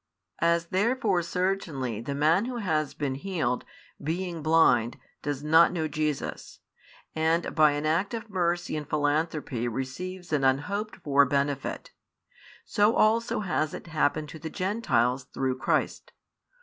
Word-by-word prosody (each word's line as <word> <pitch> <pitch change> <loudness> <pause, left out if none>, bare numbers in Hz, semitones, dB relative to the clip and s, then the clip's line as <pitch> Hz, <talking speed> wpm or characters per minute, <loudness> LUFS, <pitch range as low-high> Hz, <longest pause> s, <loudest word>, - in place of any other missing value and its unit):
As 170 0 +2
therefore 205 -1 +1
certainly 170 - -2
the 140 +4 -4
man 160 +8 +3
who 250 0 -4
has 155 -9 -1
|19 - - -37
been 140 -3 -1
healed, 140 -5 -2 0.4
being 170 +2 -3
blind, 155 -7 +3 0.2
does 145 -1 -3
not 160 +2 +6
know 160 -3 -1
Jesus, 150 -1 -3 0.6
and 160 +2 +1
by 155 -2 +5
an 145 +1 -3
act 170 +9 +1
of 225 0 -6
mercy 175 -4 -1
and 150 -1 -5
philanthropy 145 -4 0
receives 170 +9 -5
an 145 -2 +2
unhoped 200 +11 0
for 140 -1 +5
benefit; 140 0 -2 0.7
so 210 +3 +3
also 225 +1 +2
has 155 -6 -1
it - - -9
happened 155 -2 0
to 160 - -9
the 160 +1 -5
Gentiles 135 - 0
through 130 0 -2
Christ. - - -1
155 Hz, 140 wpm, -27 LUFS, 140-185 Hz, 0.7 s, not